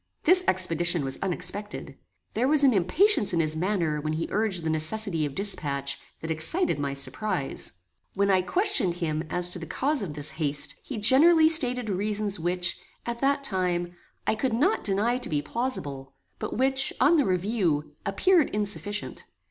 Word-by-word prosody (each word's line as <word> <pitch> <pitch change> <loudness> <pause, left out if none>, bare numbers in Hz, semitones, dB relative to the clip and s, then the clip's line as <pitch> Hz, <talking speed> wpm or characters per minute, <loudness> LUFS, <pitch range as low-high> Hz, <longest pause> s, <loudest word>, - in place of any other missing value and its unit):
This 365 +3 +5
expedition 175 -3 +1
was 135 0 +1
unexpected. 195 +3 -3 0.4
There 245 +4 0
was 295 0 +4
an 265 -3 +5
impatience 210 - +2
in 170 - +1
his 155 -1 0
manner 165 -4 -1
when 155 +1 -3
he 160 +1 -2
urged 200 -5 -1
the 160 - -2
necessity 160 +1 0
of 140 - -10
dispatch 140 -9 -1 0.2
that 160 - -4
excited 160 - +1
my 140 -1 -3
surprize. 175 +2 -2 0.4
When 200 0 +1
I 190 -1 +3
questioned 200 - +1
him 160 -3 -3
as 180 0 +1
to 180 - -5
the 165 - -8
cause 280 - -1
of 165 -7 -6
this 145 0 -3
haste, 145 -3 -1
he 265 - -7
generally 315 +9 +6
stated 250 -7 +5
reasons 205 0 -2
which, 175 +1 -1 0.3
at 235 0 -4
that 280 +1 +1
time, 180 -6 -1 0.3
I - - +1
could 240 +2 -2
not 300 - +1
deny 220 +5 +1
to - - -2
be 145 -3 -1
plausible; 145 - -5 0.2
but - - -5
which, 265 +1 +3
on 295 +6 +4
the 290 - +2
review, 180 -6 -1
appeared 345 - +2
insufficient. 205 0 -3
195 Hz, 170 wpm, -26 LUFS, 160-245 Hz, 0.4 s, generally